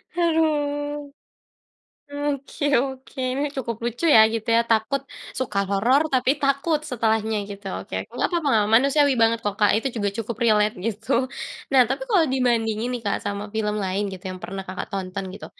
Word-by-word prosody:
Haduh. 295 -3 0 1.2
Oke 280 +1 -5 0.2
oke. 265 0 -7 0.2
Nih, 290 - 0
cukup 235 -4 -3
lucu 240 +7 -2
ya - - +9
gitu 225 -1 -3
ya, 230 - +5
takut, 230 +5 +2 0.4
suka 210 -6 -1
horor, 235 +9 +3
tapi 255 0 +3
takut 285 +3 +1
setelahnya 220 -3 0
gitu, 200 0 -9
oke. - - -7 0.2
Nggak - - 0
papa 335 -4 0
nga 220 - +4
manusiawi 280 +3 +4
banget 225 0 +4
kok, 205 -1 -1
Kak, 205 - +5
itu 225 +5 0
juga 205 -2 0
cukup 230 0 -3
relate, 215 -1 +3
gitu. 225 +2 -3 0.6
Nah, 260 - +7
tapi - - -2
kalau 375 -7 +4
dibandingin 235 -3 +1
nih, 240 - -6
Kak, 200 - +1
sama 205 0 -3
film 210 -1 0
lain 190 +2 -1
gitu 185 -1 -9
yang 185 - -8
pernah 195 0 -5
Kakak 185 - -5
tonton 195 0 -4
gitu, - - -9
230 Hz, 170 wpm, -23 LUFS, 210-275 Hz, 1.2 s, ya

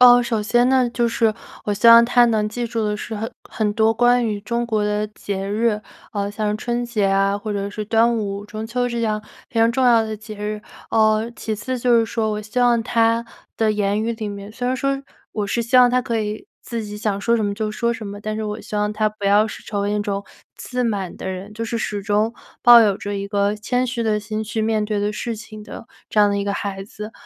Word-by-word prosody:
呃， 245 -1 +8
首 225 -2 -1
先 240 +3 +3
呢， 260 -2 +3
就 235 0 +1
是 230 -1 +2 0.3
我 210 - 0
希 210 +3 +4
望 230 0 +10
他 245 0 +5
能 220 -2 +1
记 240 +2 -3
住 230 -1 -2
的 210 - 0
是 220 +2 -6
很 220 +2 -4 0.2
很 210 -2 -1
多 220 +1 +3
关 245 +1 +3
于 210 -2 -2
中 235 +1 -2
国 215 -2 0
的 210 0 0
节 200 -2 -5
日， 215 0 +1 0.3
呃， 200 -1 -2
像 210 0 -1
春 240 +1 -2
节 220 -4 0
啊， 195 +1 +2
或 215 +1 -5
者 200 -1 -2
是 215 +1 -5
端 230 +2 +3
午、 200 -1 -4
中 215 +1 -6
秋 245 +2 -1
这 235 -1 -3
样 215 -2 0 0.3
非 230 - -3
常 230 +1 +4
重 260 0 +1
要 230 -2 +5
的 220 0 -4
节 215 0 -9
日。 210 0 -4 0.3
呃， 220 +1 +3
其 220 - -3
次 250 +5 -4
就 240 -1 +4
是 230 - +3
说， 220 0 -1
我 210 0 -3
希 220 +4 -2
望 240 -1 +4
他 230 0 +2 0.3
的 220 -1 +2
言 205 0 0
语 230 +1 -1
里 220 -2 -5
面 200 0 -8
虽 245 +2 -4
然 255 - 0
说 275 +1 -1 0.3
我 210 -2 -2
是 235 +3 0
希 255 +3 +3
望 250 -1 +7
他 250 0 +2
可 230 -3 -1
以 210 0 -4
自 230 -2 -5
己 210 0 -7
想 210 -2 -1
说 230 +4 +1
什 225 - +1
么 205 -1 -1
就 215 0 -3
说 235 +2 0
什 230 -2 -4
么， 200 0 -7
但 215 +1 -3
是 220 - -3
我 210 +1 -4
希 210 - -6
望 210 0 0
他 215 0 +1
不 210 -1 -10
要 205 +2 +4
是 - - -9
成 205 -2 -3
为 200 +1 0
那 210 - 0
种 200 -1 -2 0.3
自 250 -1 -3
满 200 -5 -2
的 - - -7
人， 190 +2 -6
就 230 +1 -3
是 230 +1 -2
始 205 -2 -3
终 210 +3 +1 0.3
抱 240 -1 +9
有 205 -3 +3
着 205 0 -4
一 200 0 -3
个 200 0 +1
谦 245 +4 -1
虚 240 -1 -2
的 215 -2 +1
心 215 +1 -4
去 220 +1 -3
面 215 -1 +1
对 210 -1 -1
的 205 +1 0
事 230 +2 -4
情 215 -1 -10
的 225 - -10 0.2
这 210 - +3
样 205 - +6
的 200 - 0
一 200 - -1
个 200 - -1
孩 195 -1 -4
子。 210 +1 -9
215 Hz, 275 characters per minute, -21 LUFS, 210-235 Hz, 0.3 s, 望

